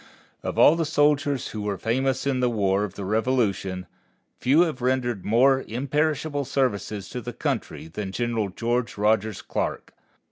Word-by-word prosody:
Of - - -4
all 155 - +7
the 165 - 0
soldiers 145 -3 +1
who 110 - -5
were 105 -1 -2
famous 130 +6 0
in 135 -2 +1
the 125 -1 +2
War 100 -3 +1
of 105 - -5
the 100 - -5
Revolution, 105 -4 0 0.5
few 140 +6 +4
have 160 -7 0
rendered 125 -5 0
more 130 +5 +4
imperishable 145 +4 -1
services 115 -7 -1
to 125 - -5
the 120 +1 -6
country - - -3
than 95 +4 -5
General 115 -2 -1
George 120 +4 -2
Rogers 105 0 +1
Clark. - - -3
120 Hz, 155 wpm, -25 LUFS, 105-135 Hz, 0.5 s, all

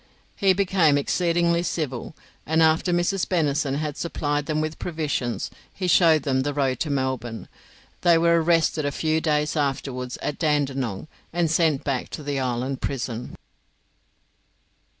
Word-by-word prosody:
He 195 -1 +3
became 180 -6 +3
exceedingly 170 +3 +1
civil, 155 -5 -3 0.3
and 160 +1 +2
after 160 +3 +3
Mrs. 175 +2 +1
Bennison 145 -5 +1
had 150 0 -3
supplied 145 -3 -2
them 155 -1 0
with 155 0 -3
provisions 150 -8 -2 0.2
he 185 - -5
showed 165 -4 +5
them 130 -2 +1
the 145 +1 -2
road 135 -3 0
to 155 - -1
Melbourne. 130 -4 -2 0.5
They 170 -2 +5
were 170 0 +4
arrested 165 -1 +2
a 145 - 0
few 160 +2 0
days 150 -2 0
afterwards 135 -3 -2
at 150 - -3
Dandenong 135 - -1 0.2
and 170 -2 0
sent 160 -4 +2
back 135 -3 -2
to 150 - -9
the 140 -1 -2
island 130 +1 -2
prison. 125 -3 -4
150 Hz, 145 wpm, -24 LUFS, 135-165 Hz, 0.5 s, showed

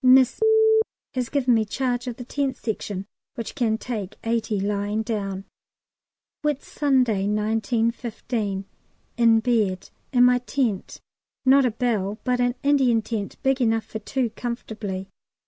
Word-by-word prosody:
Miss 255 - +5 0.7
has 250 -3 -2
given 260 -4 +2
me 225 -1 +3
charge 245 +3 -2
of 245 - -3
the 245 - -7
Tent 275 0 -1
Section, 205 -3 -4 0.3
which 230 - -5
can 225 -5 +1
take 215 -4 -5
eighty 225 -2 0
lying 205 +2 -1
down. 195 -4 -3 1.0
Whitsunday, 265 -7 +1
1915. 220 -1 -1 0.5
In 230 -2 +5
bed 215 -6 0 0.2
in 245 -2 +5
my 250 0 +5
tent, 245 -5 -2 0.4
not 270 +1 +6
a - - +2
bell, 215 -3 -1
but 250 -1 +1
an 245 0 +2
Indian 265 -6 +3
tent 215 -3 -4
big 270 -1 +2
enough 225 -2 +2
for 220 - -6
two 245 +1 -1
comfortably. 215 -5 -5
230 Hz, 130 wpm, -24 LUFS, 210-250 Hz, 1.0 s, not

